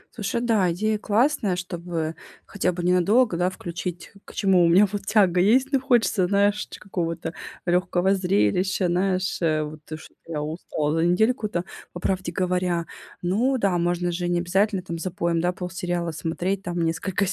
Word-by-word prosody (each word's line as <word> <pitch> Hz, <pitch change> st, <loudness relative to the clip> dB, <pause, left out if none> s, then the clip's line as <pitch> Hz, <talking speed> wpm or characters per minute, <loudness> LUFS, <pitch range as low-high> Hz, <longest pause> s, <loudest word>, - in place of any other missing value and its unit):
Слушай, 235 Hz, +2 st, -2 dB
да, 215 Hz, -7 st, +2 dB
идея 215 Hz, +5 st, 0 dB
классная, 215 Hz, -2 st, +1 dB
чтобы 170 Hz, -2 st, -4 dB, 0.3 s
хотя 185 Hz, -2 st, -1 dB
бы 175 Hz, 0 st, -5 dB
ненадолго, 180 Hz, +5 st, +3 dB
да, 175 Hz, +2 st, +1 dB
включить, 175 Hz, -1 st, -6 dB
к -, -, -13 dB
чему 190 Hz, -3 st, +4 dB
у -, -, +5 dB
меня, 190 Hz, +5 st, +6 dB
вот, 205 Hz, -1 st, -4 dB
тяга 190 Hz, -5 st, +4 dB
есть. 255 Hz, +8 st, +3 dB
Ну, 270 Hz, -2 st, +2 dB
хочется, 235 Hz, -8 st, +2 dB
знаешь, 205 Hz, +2 st, +2 dB
ч -, -, -10 dB
какого-то 165 Hz, -4 st, -4 dB, 0.3 s
лёгкого 180 Hz, +1 st, +2 dB
зрелища, 180 Hz, -, +1 dB
наешь, 185 Hz, +1 st, 0 dB
вот, 155 Hz, -2 st, -1 dB, 0.2 s
что -, -, -14 dB
я 155 Hz, -3 st, -3 dB
устала 155 Hz, -1 st, -2 dB
за 165 Hz, -, +2 dB
недельку-то, 210 Hz, 0 st, +1 dB, 0.3 s
по 175 Hz, -, -6 dB
правде 185 Hz, -1 st, -1 dB
говоря. 180 Hz, -1 st, 0 dB, 0.4 s
Ну 230 Hz, +10 st, +1 dB
да, 195 Hz, -6 st, +1 dB
можно 175 Hz, +1 st, 0 dB
же 175 Hz, +1 st, -2 dB
необязательно, 180 Hz, +3 st, +1 dB
там, 170 Hz, -2 st, -5 dB
запоем, 170 Hz, -1 st, -1 dB
да, 175 Hz, +1 st, +1 dB
полсериала 180 Hz, -1 st, -3 dB
смотреть, 175 Hz, +5 st, -2 dB
там 175 Hz, -1 st, -3 dB
несколько 170 Hz, +4 st, 0 dB
180 Hz, 160 wpm, -24 LUFS, 170-200 Hz, 0.4 s, меня